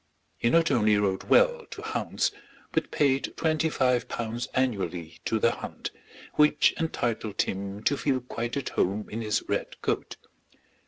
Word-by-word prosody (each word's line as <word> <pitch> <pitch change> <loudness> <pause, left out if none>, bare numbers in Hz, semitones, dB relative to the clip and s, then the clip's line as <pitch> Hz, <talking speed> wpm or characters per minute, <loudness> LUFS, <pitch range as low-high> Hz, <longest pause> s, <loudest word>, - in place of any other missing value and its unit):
He 115 - +2
not 165 +5 +4
only 105 -3 +4
rode 95 -2 0
well - - +4
to - - -8
hounds - - -1 0.4
but - - 0
paid 140 -2 +1
twenty 160 0 +1
five 125 -4 +2
pounds 115 +1 -3
annually 95 -10 -1
to 110 - +1
the 115 +2 +3
hunt, - - -6 0.4
which 150 0 +4
entitled 115 -9 -1
him 100 +2 -5
to 140 - +2
feel 135 -2 +1
quite 120 0 -4
at 140 - -2
home 100 +3 0
in 110 +2 -3
his 105 -1 0
red - - -2
coat. - - -1
120 Hz, 155 wpm, -27 LUFS, 105-140 Hz, 0.4 s, not